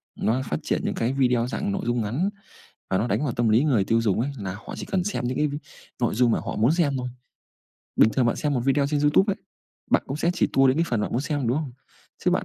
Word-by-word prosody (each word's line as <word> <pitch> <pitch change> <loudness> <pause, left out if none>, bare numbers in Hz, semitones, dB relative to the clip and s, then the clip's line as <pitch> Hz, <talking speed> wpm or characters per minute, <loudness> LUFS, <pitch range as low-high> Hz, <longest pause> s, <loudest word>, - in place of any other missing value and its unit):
nó 120 +4 0
phát 75 - 0
triển - - 0
những - - -1
cái 120 +3 0
video 125 -3 +2
dạng 200 +10 -2
nội 195 - -2
dung 120 0 0
ngắn 125 - -1 0.6
và 95 - +2
nó 110 - 0
đánh 150 - 0
vào 130 - -1
tâm 115 0 +1
lý 115 +7 +4
người 120 -10 +3
tiêu 115 +3 +2
dùng 105 -2 +1
ấy, 135 +4 -1
là 95 -3 -4
họ 105 - -9
chỉ - - -6
cần 185 -2 0
xem 190 -12 -2
những 130 - -3
cái 150 - +2 0.5
nội 120 - +1
dung 120 +1 +3
mà - - +1
họ - - -5
muốn 115 +7 +3
xem 155 -5 +1
thôi. 125 0 -3 0.9
Bình 110 - +6
thường 125 +1 +1
bạn 120 - +1
xem 145 -2 -1
một 125 - +1
video 135 +3 +2
trên 145 0 0
Youtube 150 +8 +4
ấy, - - -5 0.5
bạn - - +4
cũng 135 - -3
sẽ 170 - +2
chỉ - - +1
tua 135 0 +5
đến 130 - +3
cái 165 - +2
phần 115 -3 0
mà - - 0
bạn - - -5
muốn 120 - +1
xem, 145 -5 -2
đúng 125 - +1
không? 150 -5 -5 0.5
Chứ - - +4
bạn - - +1
130 Hz, 285 wpm, -25 LUFS, 115-150 Hz, 0.9 s, Bình